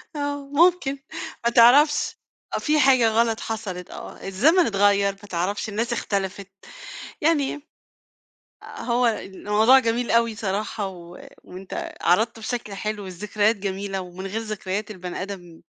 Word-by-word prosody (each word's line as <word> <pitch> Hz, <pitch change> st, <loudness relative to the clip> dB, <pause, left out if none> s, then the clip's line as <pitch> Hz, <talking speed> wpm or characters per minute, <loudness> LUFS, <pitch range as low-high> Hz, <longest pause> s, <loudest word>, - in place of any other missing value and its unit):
آه 285 Hz, -1 st, -3 dB
ممكن، 320 Hz, -4 st, +3 dB, 0.5 s
ما 235 Hz, -, +3 dB
تعرَفش، 270 Hz, +6 st, +5 dB, 0.4 s
في 305 Hz, 0 st, +1 dB
حاجة 260 Hz, -4 st, +5 dB
غلط 225 Hz, 0 st, +1 dB
حصلِت، 190 Hz, -6 st, -5 dB
آه، -, -, -9 dB
الزمن 305 Hz, -, +4 dB
إتغيّر، 200 Hz, -1 st, +3 dB
ما 195 Hz, +1 st, -15 dB
تعرَفش 190 Hz, +5 st, -2 dB
الناس 230 Hz, +3 st, -1 dB
اختلفِت، 195 Hz, -2 st, -3 dB, 0.7 s
يعني 295 Hz, -3 st, +2 dB, 1.1 s
آآ -, -, -12 dB, 0.2 s
هو 245 Hz, 0 st, +1 dB
الموضوع 215 Hz, +3 st, +3 dB
جميل 235 Hz, -1 st, 0 dB
أوي 230 Hz, -1 st, +3 dB
صراحة 205 Hz, 0 st, -2 dB
و 175 Hz, -1 st, -12 dB, 0.2 s
وأنت 185 Hz, +1 st, -7 dB
عرَضتُه 220 Hz, +5 st, +2 dB
بشكل 220 Hz, -3 st, -4 dB
حلو، 210 Hz, 0 st, -4 dB
الذكريات 210 Hz, +4 st, 0 dB
جميلة 195 Hz, 0 st, -3 dB
ومن 185 Hz, +1 st, -8 dB
غير 210 Hz, +3 st, -3 dB
ذكريات 210 Hz, -1 st, -4 dB
البني 185 Hz, -2 st, -6 dB
آدم 175 Hz, -4 st, -8 dB
215 Hz, 130 wpm, -24 LUFS, 195-240 Hz, 1.1 s, تعرَفش